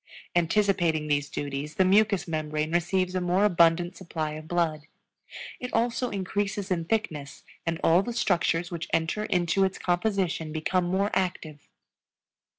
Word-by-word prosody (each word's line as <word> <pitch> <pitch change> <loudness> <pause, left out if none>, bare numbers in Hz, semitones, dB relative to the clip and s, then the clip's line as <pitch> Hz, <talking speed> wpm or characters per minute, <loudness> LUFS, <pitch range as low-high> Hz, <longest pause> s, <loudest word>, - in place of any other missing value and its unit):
Anticipating 175 -3 +2
these 145 -1 0
duties 145 +2 -4
the 190 - +3
mucous 200 0 +3
membrane 155 -1 -2
receives 180 +2 +1
a 185 - -1
more 180 +3 +2
abundant 175 -1 +3
supply 160 -4 -4
of 155 +1 -8
blood; 160 -3 -1 0.7
it 250 0 -5
also 235 +2 +1
increases 200 0 -2
in 170 -2 0
thickness 160 - -3 0.2
and 165 0 -1
all 170 +3 +5
the 240 - -4
structures 175 -5 +1
which 170 -1 -4
enter 165 +6 0
into 180 0 +1
its 190 0 0
composition 175 -3 -1
become 175 +3 0
more 190 +3 0
active. 165 -5 -3
175 Hz, 145 wpm, -27 LUFS, 160-195 Hz, 0.7 s, all